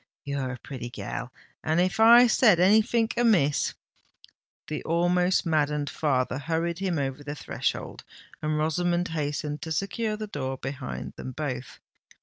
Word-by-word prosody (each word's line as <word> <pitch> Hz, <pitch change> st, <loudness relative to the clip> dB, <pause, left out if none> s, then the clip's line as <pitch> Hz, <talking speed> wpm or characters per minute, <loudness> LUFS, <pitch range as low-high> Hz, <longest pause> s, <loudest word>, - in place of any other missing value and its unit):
"You're 140 Hz, -2 st, -2 dB
a -, -, -7 dB
pretty 125 Hz, -2 st, -7 dB
gal—and 130 Hz, +6 st, -4 dB
if 185 Hz, +4 st, +1 dB
I 235 Hz, +2 st, +9 dB
said 220 Hz, -6 st, +5 dB
anythink 220 Hz, +4 st, +3 dB
amiss——" 195 Hz, -12 st, +2 dB, 0.9 s
The 155 Hz, -, -4 dB
almost 180 Hz, +3 st, +2 dB
maddened 150 Hz, -2 st, 0 dB
father 130 Hz, -3 st, 0 dB
hurried 165 Hz, +3 st, -2 dB
him 185 Hz, -4 st, -1 dB
over 135 Hz, 0 st, -3 dB
the 145 Hz, +1 st, -5 dB
threshold, -, -, -3 dB, 0.4 s
and 155 Hz, 0 st, -1 dB
Rosamond 175 Hz, +3 st, 0 dB
hastened 150 Hz, -1 st, -3 dB
to 160 Hz, -, -6 dB
secure 210 Hz, +5 st, -1 dB
the 215 Hz, -, -4 dB
door 135 Hz, -9 st, -4 dB
behind 135 Hz, 0 st, -6 dB
them 130 Hz, -, -6 dB
both. 130 Hz, -3 st, -5 dB
155 Hz, 135 wpm, -27 LUFS, 140-185 Hz, 0.9 s, I